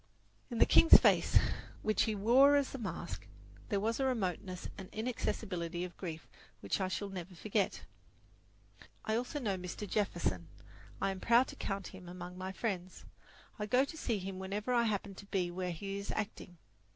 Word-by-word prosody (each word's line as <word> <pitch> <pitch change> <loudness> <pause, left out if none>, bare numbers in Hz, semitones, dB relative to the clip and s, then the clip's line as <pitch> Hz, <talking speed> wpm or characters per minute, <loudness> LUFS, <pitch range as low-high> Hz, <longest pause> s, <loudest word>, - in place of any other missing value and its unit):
In 240 - -4
the - - +7
king's 330 - +9
face, - - +4 0.5
which 215 0 +2
he 220 - -1
wore 255 +8 +6
as 285 -2 +1
a 270 - -5
mask, 170 - -5 0.4
there 200 - +1
was 225 +4 0
a 270 - +2
remoteness 190 -6 -2
and 190 -2 -9
inaccessibility 185 -7 -2
of 180 -1 -6
grief 165 -4 -6 0.3
which - - -1
I 190 - +1
shall 200 +2 -3
never 185 -1 -7
forget. 205 +3 -1 1.2
I 220 - +1
also 250 +5 -2
know 205 -7 -1
Mr. 180 +3 -5
Jefferson. 105 - -1 0.5
I 195 - +1
am 190 - -5
proud 235 +5 +4
to - - -8
count 195 -1 -3
him 185 -2 -11
among 180 0 -7
my 185 +1 -5
friends. 190 -3 -4 0.5
I 210 - -2
go 255 +5 +4
to 300 - -9
see 235 -8 -1
him 190 0 -5
whenever 205 +5 -2
I 235 -1 +4
happen 205 -2 -1
to 200 - -11
be 180 -3 0
where 180 +1 -3
he 195 +4 -4
is 200 - -7
acting. 200 -4 -4
195 Hz, 180 wpm, -34 LUFS, 180-225 Hz, 1.2 s, king's